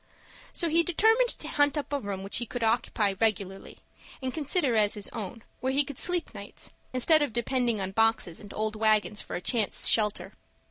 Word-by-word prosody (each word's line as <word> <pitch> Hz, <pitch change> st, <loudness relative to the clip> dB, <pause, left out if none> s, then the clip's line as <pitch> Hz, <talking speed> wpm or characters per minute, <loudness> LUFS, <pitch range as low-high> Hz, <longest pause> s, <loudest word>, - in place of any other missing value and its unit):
So 340 Hz, -, -1 dB
he 330 Hz, +1 st, +3 dB
determined 445 Hz, +9 st, +3 dB
to -, -, -3 dB
hunt 290 Hz, 0 st, +2 dB
up 290 Hz, 0 st, -4 dB
a 285 Hz, -, +1 dB
room 200 Hz, -4 st, -5 dB
which 195 Hz, -, 0 dB
he 240 Hz, -, -4 dB
could 245 Hz, +1 st, -4 dB
occupy 220 Hz, -3 st, +1 dB
regularly, 195 Hz, -3 st, -1 dB, 0.4 s
and 260 Hz, -1 st, -4 dB
consider 295 Hz, -3 st, +1 dB
as 210 Hz, -2 st, +3 dB
his 205 Hz, -1 st, -4 dB
own, 220 Hz, 0 st, -7 dB, 0.2 s
where 260 Hz, -, -1 dB
he 285 Hz, +2 st, +4 dB
could 280 Hz, -2 st, -8 dB
sleep 355 Hz, -1 st, 0 dB
nights, -, -, -8 dB, 0.2 s
instead 305 Hz, +5 st, +3 dB
of 290 Hz, -6 st, -1 dB
depending 240 Hz, -2 st, 0 dB
on 190 Hz, 0 st, -2 dB
boxes 225 Hz, -5 st, +1 dB
and 205 Hz, -1 st, -11 dB
old 215 Hz, 0 st, -1 dB
wagons 215 Hz, -1 st, +1 dB
for -, -, -7 dB
a -, -, -4 dB
chance 220 Hz, +1 st, +1 dB
shelter. 210 Hz, -2 st, +2 dB
230 Hz, 195 wpm, -28 LUFS, 210-285 Hz, 0.4 s, he